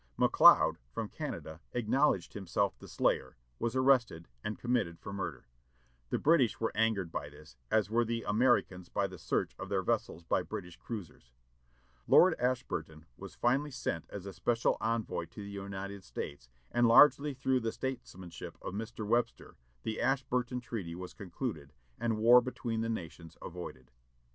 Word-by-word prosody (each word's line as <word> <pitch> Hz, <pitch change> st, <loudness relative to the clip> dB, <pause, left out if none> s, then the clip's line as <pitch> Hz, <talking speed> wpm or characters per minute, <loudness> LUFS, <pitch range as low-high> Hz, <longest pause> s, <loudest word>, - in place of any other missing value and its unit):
McLeod, -, -, +6 dB
from -, -, -4 dB
Canada, 80 Hz, +1 st, -6 dB
acknowledged 120 Hz, -, +1 dB
himself 100 Hz, 0 st, -1 dB
the -, -, -11 dB
slayer, -, -, 0 dB, 0.2 s
was 115 Hz, +1 st, -1 dB
arrested, 130 Hz, -11 st, +3 dB, 0.2 s
and 105 Hz, -, -3 dB
committed 120 Hz, -9 st, 0 dB
for 100 Hz, -, -7 dB
murder. 100 Hz, -, -5 dB, 0.6 s
The -, -, 0 dB
British 145 Hz, -7 st, +3 dB
were 115 Hz, -, 0 dB
angered 105 Hz, -6 st, +1 dB
by 70 Hz, -, -4 dB
this, 75 Hz, -1 st, -15 dB
as 110 Hz, -2 st, +3 dB
were 120 Hz, +1 st, +3 dB
the 115 Hz, 0 st, -2 dB
Americans 105 Hz, -5 st, +2 dB
by -, -, 0 dB
the -, -, -7 dB
search -, -, -1 dB
of -, -, -6 dB
their -, -, 0 dB
vessels 85 Hz, -, -1 dB
by -, -, +1 dB
British 90 Hz, -1 st, -7 dB
cruisers. 90 Hz, -, -8 dB, 0.8 s
Lord 185 Hz, -1 st, +7 dB
Ashburton 80 Hz, -11 st, -2 dB
was -, -, -10 dB
finally 135 Hz, +5 st, +1 dB
sent 85 Hz, -, -4 dB
as 100 Hz, -2 st, -7 dB
a 100 Hz, -, -6 dB
special 115 Hz, +7 st, +1 dB
envoy 115 Hz, 0 st, -1 dB
to 105 Hz, -, -10 dB
the 100 Hz, -, -8 dB
United 100 Hz, 0 st, -6 dB
States, -, -, -7 dB, 0.2 s
and 120 Hz, 0 st, +4 dB
largely 145 Hz, +4 st, +6 dB
through 130 Hz, 0 st, +1 dB
the 115 Hz, -2 st, -2 dB
statesmanship 95 Hz, -10 st, -6 dB
of -, -, -6 dB
Mr. 110 Hz, +1 st, -5 dB
Webster 120 Hz, +3 st, -1 dB, 0.3 s
the 110 Hz, -, -3 dB
Ashburton 125 Hz, -1 st, 0 dB
treaty 105 Hz, -8 st, -5 dB
was 90 Hz, 0 st, -7 dB
concluded, 90 Hz, -, -5 dB, 0.3 s
and 115 Hz, -1 st, 0 dB
war 120 Hz, +3 st, +7 dB
between 120 Hz, -2 st, -3 dB
the 115 Hz, -, -1 dB
nations 85 Hz, -5 st, -6 dB
avoided. 65 Hz, -8 st, -8 dB
110 Hz, 160 wpm, -32 LUFS, 90-120 Hz, 0.8 s, Lord